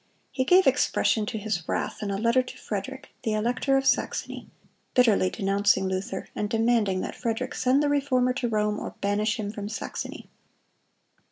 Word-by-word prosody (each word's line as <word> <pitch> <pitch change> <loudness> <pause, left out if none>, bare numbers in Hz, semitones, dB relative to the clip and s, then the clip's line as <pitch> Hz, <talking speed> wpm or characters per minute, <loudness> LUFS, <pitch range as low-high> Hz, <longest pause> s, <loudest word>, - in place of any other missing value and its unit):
He 260 - -1
gave 365 +6 +6
expression 215 -2 +2
to 220 - -3
his 205 -6 -3
wrath - - -2
in 205 - -3
a 195 - -1
letter 230 +4 +3
to 250 - -10
Frederick, 265 +7 -5
the 220 - -1
elector 250 +5 +1
of 270 - -1
Saxony, - - -1 0.5
bitterly 220 -7 +4
denouncing 195 -1 +1
Luther, 190 +5 -3
and 210 - -2
demanding 225 -4 +2
that - - -4
Frederick 235 +1 -3
send 260 +3 +2
the - - +2
Reformer 260 -3 +2
to 250 -2 -2
Rome 210 -1 0
or - - -6
banish 210 +2 0
him 205 -1 -3
from 205 -1 -6
Saxony. 220 - -6
220 Hz, 170 wpm, -26 LUFS, 205-255 Hz, 0.5 s, gave